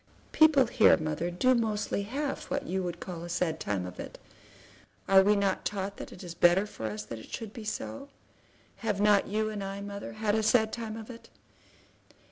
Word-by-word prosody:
"People 305 -4 +6
here, 230 -1 +5
mother, 155 +1 -2
do 180 +9 +3
mostly 215 -4 0
have 275 +7 -3
what 280 0 -3
you 185 -1 -1
call 175 -3 -6
a 175 - -7
sad 170 -2 -1
time 95 -3 -2
of 90 0 -9
it. - - -7 0.9
Are 195 0 +7
we 205 +2 +4
not 200 -2 0
taught 200 -1 -3
that - - -8
it 185 - -11
is 175 -2 -7
better 175 +3 +4
for 110 - -6
us 105 0 -5
that 110 +1 -7
it - - -13
should 220 -2 -6
be 230 - -8
so? 275 +6 -5 0.7
Have 210 -4 -2
not 205 -1 +4
you 215 +1 -1
and 205 -2 -4
I, 195 0 -5
mother, 200 0 -6
had 215 -1 0
a 220 - +2
sad 220 0 +3
time 225 -2 -5
of 225 +2 -8
it? 230 - -13
200 Hz, 200 wpm, -29 LUFS, 175-220 Hz, 0.9 s, Are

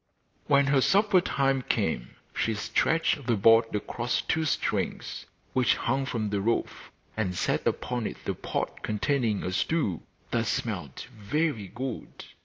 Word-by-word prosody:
When 140 -1 +5
her 140 -1 +3
supper 200 +3 +4
time 135 -5 +1
came 90 - -1 0.2
she 110 - 0
stretched 145 +5 +1
the 120 - +3
board 115 +2 +5
across 120 +3 -1
two 160 0 0
strings 150 - -2 0.3
which 130 -1 +3
hung 135 +2 -1
from 110 -5 -2
the 100 -1 0
roof, 115 +3 -1 0.3
and 95 -5 -1
set - - 0
upon 125 -3 -1
it - - -7
the - - 0
pot - - -4
containing 110 -1 0
a 90 - -2
stew 100 - 0 0.3
that 115 0 +1
smelt 90 - -3
very 110 +1 -1
good. 125 +3 -6
120 Hz, 145 wpm, -28 LUFS, 105-140 Hz, 0.3 s, When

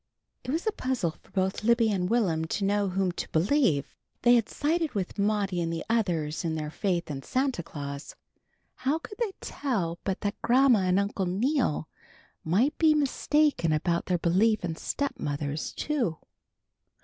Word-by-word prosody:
It - - -8
was 320 - -1
a 435 - +2
puzzle 255 - -1
for - - -24
both 190 +1 -1
Libby 230 -1 +4
and 180 -2 0
Will'm 185 -9 +1
to 195 +5 -2
know 200 0 +1
whom 190 0 0
to - - -5
believe. 165 - +2 0.3
They 240 0 +7
had 235 -3 +3
sided 315 -2 0
with 195 +1 -3
Maudie 200 -3 +1
and 165 0 -1
the 165 -1 -4
others 170 -10 0
in 160 -2 -1
their 150 -1 -4
faith 175 -3 -1
in 135 -2 -5
Santa 260 - -1
Claus. 140 -2 -7 0.6
How 270 +4 +1
could 405 +5 -10
they 445 -5 -1
tell 190 -12 -2
but 195 -1 -2
that 205 0 -3
Grandma 245 0 +5
and 185 +1 +3
Uncle 200 -2 -1
Neal 220 - 0 0.6
might 225 - +2
be 315 -2 +5
mistaken 295 - +2
about 170 +3 0
their 180 - +2
belief 190 +5 +2
in 165 -2 -3
stepmothers 150 - -3
too? 245 - -1
200 Hz, 165 wpm, -28 LUFS, 170-255 Hz, 0.6 s, They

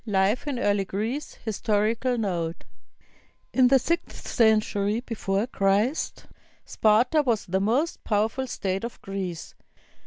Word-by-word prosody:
II 210 - -4
LIFE 195 +8 +2
IN 280 -3 -1
EARLY 205 -4 +1
GREECE 225 +10 -3
HISTORICAL 220 +3 0
NOTE 175 -6 -2 0.9
In 255 -1 +5
the 270 +2 +6
sixth 335 +6 -3
century 215 -2 +2
before 210 -4 -1
Christ, 210 +4 0 0.4
Sparta 235 +8 +3
was 235 -7 0
the 190 +2 0
most 255 +11 0
powerful 220 +5 0
state 195 -4 -2
of 235 - -6
Greece. 190 -4 -5
215 Hz, 125 wpm, -26 LUFS, 195-245 Hz, 0.9 s, the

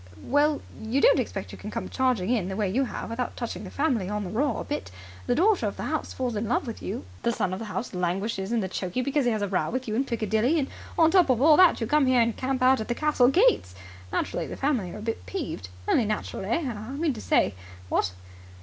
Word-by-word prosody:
Well, 290 +2 +2 0.2
you 225 +5 0
don't - - +5
expect - - -4
you - - -10
can - - -6
come - - -4
charging 250 -6 0
in 215 -8 +1
the 190 - -3
way 210 -1 0
you 255 +9 +1
have 235 - -6
without 245 +2 -3
touching 235 -3 -4
the 190 - -7
family 250 -10 0
on 210 0 -2
the 180 - -5
raw 275 +7 0
a - - -3
bit. 295 - -4 0.4
The 245 - +2
daughter 395 - +3
of - - -5
the - - -4
house - - -2
falls 250 -3 -2
in 210 +2 -2
love 245 - +1
with 230 -3 -6
you; - - -5 0.2
the 235 - +1
son 190 -5 -1
of 185 - -4
the 225 - -5
house 215 +3 -4
languishes 190 +3 -2
in 225 -5 +1
chokey 185 +5 -3
because 280 +1 +1
he 240 - +3
has 215 -2 -1
a - - 0
row 190 -1 0
with 255 +1 -3
you 215 - -2
in 245 +5 +2
Piccadilly; 230 +4 +1
and 280 -3 0 0.3
on 325 -1 +5
top 360 -5 +5
of 250 -3 +3
all 300 +3 +7
that 365 -2 +6
you 230 - -1
come 295 +3 +3
here 255 -1 +4
and 230 -1 +2
camp 260 -1 -1
out 260 -1 +5
at 220 - -5
the 240 - -1
castle 300 -4 +3
gates! 360 - +3 0.4
Naturally - - -2
the - - -7
family 260 -10 0
are - - -7
a - - -8
bit 225 0 -3
peeved. 295 - -5 0.2
Only 240 - +3
natural, 210 -2 -3
eh? 275 - 0
I 215 +3 -8
mean 300 0 0
to 220 - -8
say, 100 - +2 0.3
what?" 90 - +1
240 Hz, 260 wpm, -26 LUFS, 210-275 Hz, 0.4 s, all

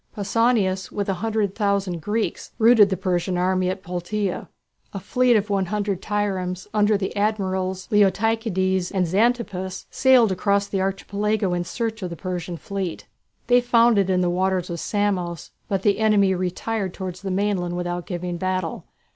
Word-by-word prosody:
Pausanias, 205 -3 +1
with 200 -1 -3
a - - +2
hundred 215 -3 0
thousand 200 -5 -1
Greeks, 215 +5 -2
routed 225 -3 +6
the 190 - -1
Persian 180 0 -1
army 185 0 +1
at 190 +1 -4
Platæa. 180 +2 -3 0.5
A 195 - -4
fleet 245 +5 +2
of 210 -1 +1
110 200 0 0
triremes, 190 -3 -2
under 210 0 +3
the 195 -1 -4
admirals 190 -3 -1
Leotychides 195 -2 +1
and 190 -2 +1
Xantippus, 195 -1 0
sailed 255 -5 +5
across 200 +2 +1
the 195 -1 -2
Archipelago 200 +1 -1
in 175 0 -1
search 225 +4 -4
of 180 - -3
the 170 - -6
Persian 180 -1 -5
fleet. 190 -1 -5 0.4
They 245 0 +4
found 235 -2 +4
it 195 -1 +1
in 185 -1 +2
the 180 - +2
waters 185 0 0
of 170 - -4
Samos, 185 -5 -2 0.2
but 195 -1 -1
the 205 0 +2
enemy 205 -3 +4
retired 185 +2 -2
towards 185 -2 -6
the 195 - -4
mainland 185 -2 -1
without 175 0 -3
giving 175 -1 -4
battle. 185 -2 -2
195 Hz, 160 wpm, -23 LUFS, 185-210 Hz, 0.5 s, routed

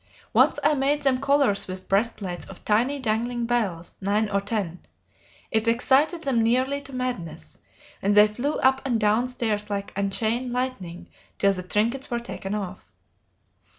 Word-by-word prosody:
Once - - +4
I 300 - +4
made 290 +1 +1
them 265 -2 +2
collars 275 -6 +2
with 185 0 -6
breastplates 195 -3 -1
of 195 - -13
tiny 240 +7 +2
dangling 240 -1 -1
bells, 205 -8 -2
nine 205 +2 +1
or 200 0 +1
ten; 200 -4 -2 0.7
it 220 +1 +1
excited 270 +8 +3
them 255 -5 +1
nearly 255 +5 +1
to 275 - -9
madness, 175 - -5 0.4
and 205 +1 +2
they 210 0 +9
flew 245 +8 -2
up 265 0 +3
and 245 -4 0
down 215 +3 +2
stairs 220 -4 -2
like 200 -1 -4
unchained 220 +5 0
lightning 240 -9 -4 0.3
till 200 0 +3
the 185 - -5
trinkets 225 +8 0
were 240 - -1
taken 210 -4 -5
off." 195 -2 -6
225 Hz, 155 wpm, -25 LUFS, 200-255 Hz, 0.7 s, they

